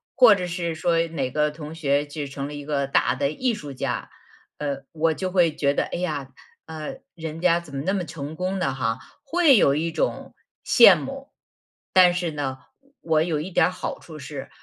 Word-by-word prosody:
或 245 Hz, -5 st, +8 dB
者 180 Hz, -2 st, -3 dB
是 170 Hz, -2 st, -3 dB
说 165 Hz, +1 st, +1 dB
哪 140 Hz, -6 st, -3 dB
个 150 Hz, +1 st, +1 dB
同 150 Hz, 0 st, -8 dB
学 145 Hz, -2 st, +1 dB
就 145 Hz, 0 st, -5 dB
成 140 Hz, 0 st, -5 dB
了 145 Hz, -, -8 dB
一 145 Hz, 0 st, -7 dB
个 140 Hz, -2 st, 0 dB
大 130 Hz, -, +2 dB
的 140 Hz, +2 st, 0 dB
艺 250 Hz, +8 st, 0 dB
术 145 Hz, -9 st, -7 dB
家。 130 Hz, -, -3 dB, 0.5 s
呃， 140 Hz, -2 st, -3 dB
我 160 Hz, 0 st, +1 dB
就 185 Hz, +1 st, -3 dB
会 170 Hz, -4 st, +3 dB
觉 140 Hz, -2 st, +1 dB
得， -, -, 0 dB
哎 -, -, -5 dB
呀， 150 Hz, -6 st, -3 dB, 0.4 s
呃， 155 Hz, -1 st, -6 dB, 0.2 s
人 160 Hz, -1 st, -6 dB
家 170 Hz, -1 st, +4 dB
怎 155 Hz, -5 st, -11 dB
么 135 Hz, -, -2 dB
那 190 Hz, +5 st, 0 dB
么 180 Hz, -4 st, -2 dB
成 150 Hz, -1 st, -7 dB
功 185 Hz, +3 st, -2 dB
的 135 Hz, -, 0 dB
哈。 115 Hz, -4 st, -1 dB, 0.2 s
会 315 Hz, -3 st, +4 dB
有 140 Hz, -, +5 dB
一 160 Hz, +3 st, -1 dB
种 160 Hz, -, -2 dB, 0.3 s
羡 215 Hz, -6 st, +8 dB
慕。 270 Hz, -, -7 dB, 0.6 s
但 180 Hz, -1 st, +7 dB
是 175 Hz, -1 st, -1 dB
呢， 135 Hz, -3 st, -4 dB, 0.4 s
我 160 Hz, -1 st, +2 dB
有 160 Hz, -3 st, -1 dB
一 180 Hz, -, -5 dB
点 -, -, +3 dB
儿 -, -, 0 dB
好 185 Hz, -, -5 dB
处 155 Hz, -2 st, -11 dB
是， 140 Hz, 0 st, -7 dB
160 Hz, 220 characters per minute, -24 LUFS, 145-180 Hz, 0.6 s, 或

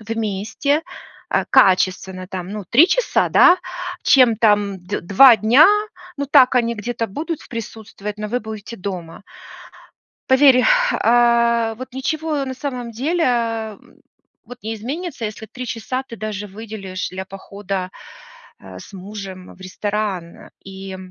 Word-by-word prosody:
вместе, 225 Hz, +7 st, -2 dB, 0.5 s
а, -, -, +1 dB
качественно, 185 Hz, 0 st, +2 dB
там, 185 Hz, -2 st, -6 dB
ну, 210 Hz, -1 st, -6 dB
3 295 Hz, +9 st, +7 dB
часа, -, -, +1 dB
да, 360 Hz, +1 st, +6 dB, 0.4 s
чем 250 Hz, -5 st, +5 dB
там 205 Hz, -3 st, +2 dB
дв 195 Hz, +3 st, -3 dB
2 225 Hz, +7 st, +7 dB
дня, 240 Hz, +9 st, +6 dB, 0.5 s
ну 285 Hz, -, -2 dB
так 260 Hz, -2 st, +5 dB
они 235 Hz, -1 st, +1 dB
где-то 230 Hz, +1 st, -3 dB
будут 315 Hz, -, -5 dB
в -, -, -16 dB
присутствовать, 215 Hz, -2 st, -7 dB
но 210 Hz, -, -4 dB
вы 245 Hz, +3 st, -1 dB
будете 220 Hz, 0 st, -8 dB
дома. 180 Hz, -3 st, -7 dB, 1.1 s
Поверь, 260 Hz, -1 st, +5 dB, 0.3 s
а, 235 Hz, -1 st, +2 dB
вот 255 Hz, +2 st, -9 dB
ничего 305 Hz, +2 st, -2 dB
на 260 Hz, -, -4 dB
самом 250 Hz, -3 st, -5 dB
деле, 320 Hz, +9 st, -1 dB
м, 225 Hz, -4 st, -3 dB, 0.5 s
вот 245 Hz, +2 st, -11 dB
не 220 Hz, -, -4 dB
изменится, 270 Hz, -, -5 dB
если 215 Hz, +1 st, -8 dB
3 250 Hz, +3 st, -8 dB
часа 245 Hz, +3 st, -4 dB
ты 230 Hz, -, -9 dB
даже 210 Hz, -1 st, -5 dB
выделишь 200 Hz, -2 st, -7 dB
для 190 Hz, +1 st, -6 dB
похода, 195 Hz, -1 st, -6 dB, 0.7 s
а, 95 Hz, -1 st, -11 dB
с -, -, -13 dB
мужем 190 Hz, -1 st, -9 dB
в -, -, -23 dB
ресторан. 190 Hz, -2 st, -4 dB
И 190 Hz, 0 st, -8 dB
220 Hz, 140 wpm, -20 LUFS, 195-250 Hz, 1.1 s, 3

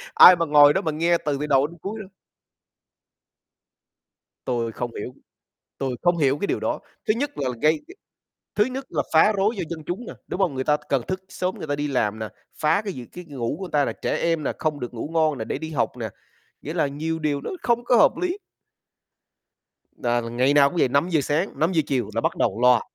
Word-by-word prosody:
ai 180 Hz, -, +10 dB
mà 170 Hz, -1 st, 0 dB
ngồi 145 Hz, -1 st, +7 dB
đó 190 Hz, -, +1 dB
mà 160 Hz, -, -1 dB
nghe 170 Hz, +3 st, +2 dB
từ 145 Hz, -2 st, 0 dB
từ 150 Hz, -, -2 dB
đầu 140 Hz, 0 st, +3 dB
đến 170 Hz, -, -14 dB
cuối 215 Hz, +3 st, -5 dB
đâu. 200 Hz, -3 st, -9 dB, 2.4 s
Tui 120 Hz, -2 st, -1 dB
không 120 Hz, +1 st, -4 dB
hiểu, 125 Hz, +5 st, -6 dB, 0.6 s
tui 135 Hz, -2 st, -2 dB
không 175 Hz, -1 st, +2 dB
hiểu 140 Hz, -2 st, +2 dB
cái 200 Hz, -, -2 dB
điều -, -, -1 dB
đó. -, -, -2 dB, 0.3 s
Thứ 215 Hz, -, +4 dB
nhất 285 Hz, +5 st, -3 dB
là 135 Hz, -2 st, -1 dB
gây 155 Hz, +1 st, +4 dB
g -, -, -12 dB, 0.6 s
thứ 210 Hz, -, +4 dB
nhất 265 Hz, +1 st, -5 dB
là 150 Hz, -, -1 dB
phá 160 Hz, +7 st, +6 dB
rối 205 Hz, +3 st, +1 dB
do 190 Hz, -, -3 dB
dân 165 Hz, -2 st, -6 dB
chúng 190 Hz, +8 st, -4 dB
nè, -, -, -7 dB
đúng -, -, -4 dB
không? 175 Hz, -7 st, +2 dB
Người 130 Hz, -, -1 dB
ta 150 Hz, +2 st, +2 dB
cần 135 Hz, -3 st, +2 dB
thức 185 Hz, 0 st, -3 dB
sớm 185 Hz, +1 st, -2 dB
người 155 Hz, -, -7 dB
ta 145 Hz, -, 0 dB
đi 145 Hz, +1 st, -2 dB
làm 110 Hz, -6 st, 0 dB
nè, 110 Hz, -1 st, -4 dB, 0.3 s
phá 155 Hz, +6 st, +3 dB
cái 205 Hz, -3 st, -5 dB
gì 125 Hz, -5 st, -8 dB
cái 180 Hz, +8 st, -11 dB
ngủ 135 Hz, -4 st, -3 dB
của -, -, -5 dB
người 180 Hz, -, -10 dB
ta 145 Hz, -2 st, +3 dB
là -, -, -2 dB
trẻ -, -, -2 dB
em 165 Hz, -2 st, 0 dB
nè, -, -, 0 dB
không 155 Hz, -2 st, -1 dB
được 125 Hz, -2 st, -6 dB
ngủ 120 Hz, +5 st, -5 dB
ngon 155 Hz, -3 st, +2 dB
nè, 110 Hz, -, -4 dB
để -, -, -3 dB
đi 160 Hz, 0 st, -6 dB
học 125 Hz, -3 st, -1 dB
nè, 115 Hz, -2 st, -4 dB, 0.5 s
nghĩa -, -, -5 dB
là -, -, +2 dB
nhiều 155 Hz, +4 st, -3 dB
điều 150 Hz, -3 st, -1 dB
nó -, -, -5 dB
không 240 Hz, 0 st, +1 dB
có 245 Hz, -, +4 dB
hợp 220 Hz, -, +7 dB
lý. 360 Hz, +2 st, -1 dB, 1.6 s
Nà 120 Hz, 0 st, 0 dB
là 115 Hz, -, -6 dB
ngày 125 Hz, +4 st, +2 dB
nào 140 Hz, -1 st, +6 dB
cũng 175 Hz, -, -7 dB
vậy, 160 Hz, -, +4 dB
5:00 150 Hz, +5 st, +2 dB
sáng, 150 Hz, +8 st, -1 dB
5:00 165 Hz, +1 st, +2 dB
chiều 130 Hz, -5 st, -1 dB
là 115 Hz, -, +1 dB
bắt -, -, 0 dB
đầu -, -, 0 dB
loa. 125 Hz, -2 st, +5 dB
150 Hz, 240 wpm, -24 LUFS, 135-180 Hz, 2.4 s, ai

